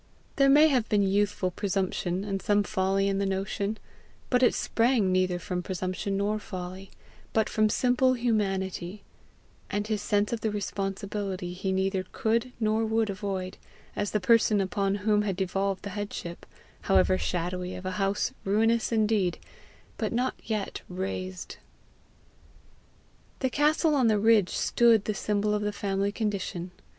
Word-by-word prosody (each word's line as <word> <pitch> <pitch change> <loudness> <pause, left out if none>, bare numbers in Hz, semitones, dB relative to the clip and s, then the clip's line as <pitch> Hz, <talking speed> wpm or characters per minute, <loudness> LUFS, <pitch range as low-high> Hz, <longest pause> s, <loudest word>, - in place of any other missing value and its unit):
There 275 -1 +5
may 300 +3 +7
have 250 -6 +1
been 205 -2 +3
youthful 200 -1 +1
presumption 190 -1 -1
and 195 -2 -3
some 205 +2 +2
folly 195 +1 +1
in 195 0 0
the 200 - +1
notion, 200 +2 -2 0.5
but 250 -1 +3
it 245 - +4
sprang 230 -5 +2
neither 185 -1 +2
from 180 0 -3
presumption 185 +2 -3
nor 210 +2 0
folly, 185 0 -7 0.4
but 220 -1 +2
from 215 0 +2
simple 250 +3 +3
humanity, 195 -5 -1 0.7
and 205 0 -1
his 215 -1 -1
sense 205 +2 +1
of 230 - -3
the 220 - 0
responsibility 195 -2 -3
he 190 +1 -2
neither 190 0 0
could 230 +3 0
nor 220 0 +1
would 220 -1 +1
avoid, 190 -1 -4 0.4
as 205 - -1
the 210 - 0
person 215 +1 +4
upon 195 +1 0
whom 210 -1 +4
had 200 -3 -1
devolved 195 +1 -1
the 200 - -5
headship, 200 -4 -6 0.3
however 95 -1 +3
shadowy, 180 - -2
of 180 - -8
a 185 - -1
house, 195 +1 0
ruinous 225 +4 +2
indeed, 215 -5 +1 0.6
but - - -1
not 250 +2 0
yet 215 -3 -3
razed. 185 0 -5 1.8
The 260 -1 +1
castle 305 +3 +3
on 265 -5 +3
the 215 -1 +3
ridge 215 -3 +4
stood 230 -3 +3
the 215 - 0
symbol 210 +1 0
of 210 - 0
the 210 0 -1
family 200 0 -1
condition. 195 -5 -3
200 Hz, 150 wpm, -28 LUFS, 190-220 Hz, 1.8 s, may